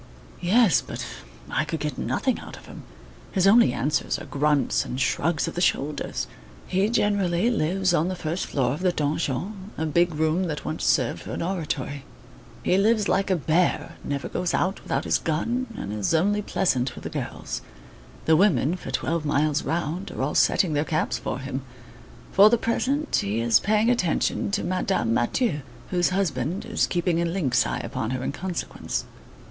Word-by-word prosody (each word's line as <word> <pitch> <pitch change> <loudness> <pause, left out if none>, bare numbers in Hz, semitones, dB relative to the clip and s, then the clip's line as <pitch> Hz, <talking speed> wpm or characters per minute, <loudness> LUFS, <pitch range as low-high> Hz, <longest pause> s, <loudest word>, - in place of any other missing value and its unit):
"Yes, 200 +1 +4
but - - -6 0.5
I - - +1
could 160 +1 -4
get 150 0 -3
nothing 260 -3 -1
out - - -10
of - - -14
him. - - -10 0.5
His 190 -2 +2
only 215 - +6
answers 135 +5 0
are - - -8
grunts 145 0 +1
and 125 - -5
shrugs 155 +4 +1
of - - -4
the 175 - -3
shoulders. 150 -4 0 0.4
He 195 +3 +1
generally 205 -2 +2
lives 185 -2 +1
on 165 0 +2
the 185 - -2
first 170 +1 -3
floor 130 -3 0
of 150 - -5
the 180 0 +2
donjon, 165 +6 -2
a 160 - -1
big 170 +2 +2
room 160 +4 +1
that 150 -3 -4
once 155 - -3
served 125 -4 +2
for - - -7
an - - -2
oratory. 150 -6 -3 0.6
He 185 - +3
lives 215 0 +3
like 195 0 +1
a 190 - +3
bear, 165 +2 0
never 140 -1 -3
goes 180 -1 -1
out 190 +2 0
without 135 +2 -1
his - - +1
gun, 235 +11 -1
and 100 - -4
is 105 +9 0
only 205 +6 +2
pleasant 130 -11 0
with - - -10
the - - -4
girls. - - -4 0.6
The 160 - +5
women, 180 -2 +3
for - - -8
twelve 165 -1 -1
miles 150 +1 +1
round, 170 +4 -2
are - - -4
all 145 - -1
setting 175 -5 +3
their 145 0 +2
caps 155 0 -1
for - - -3
him. 135 0 -4 0.7
For 200 +2 +7
the 235 - +4
present, 270 +6 0
he 105 +3 -1
is 115 0 +4
paying 215 +3 +2
attention 185 -6 0
to 200 +1 -1
Madame 185 - 0
Mathieu, 150 - +1 0.3
whose 175 -2 +2
husband 180 -3 -1
is - - +1
keeping 175 -1 0
a - - +1
lynx 165 - +1
eye - - -2
upon 110 - -3
her 130 0 -2
in - - -1
consequence." 180 +3 -4
170 Hz, 185 wpm, -25 LUFS, 145-195 Hz, 0.7 s, For